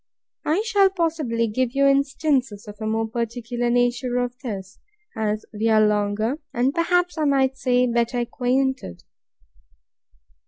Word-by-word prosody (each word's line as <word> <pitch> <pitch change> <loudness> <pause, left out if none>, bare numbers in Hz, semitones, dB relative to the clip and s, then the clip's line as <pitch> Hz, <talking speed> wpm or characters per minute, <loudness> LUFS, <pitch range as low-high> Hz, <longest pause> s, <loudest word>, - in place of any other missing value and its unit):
I 335 +8 +2
shall, 400 -4 +4
possibly, 315 -11 -1
give 240 +3 -1
you 275 0 +3
instances 275 -5 +1
of 210 +2 -11
a 215 - -2
more 225 +1 0
particular 235 +1 -3
nature 245 +1 +1
of 245 0 -1
this, 200 -7 -7 0.4
as 215 -1 -2
we 220 +2 0
are 215 -1 +5
longer, 210 +5 0 0.2
and, 250 +3 +1
perhaps, 355 +1 +1
I 305 - +1
might 270 -2 +2
say, 250 -1 +2
better 235 0 0
acquainted. 250 - -1
245 Hz, 135 wpm, -23 LUFS, 225-275 Hz, 0.4 s, are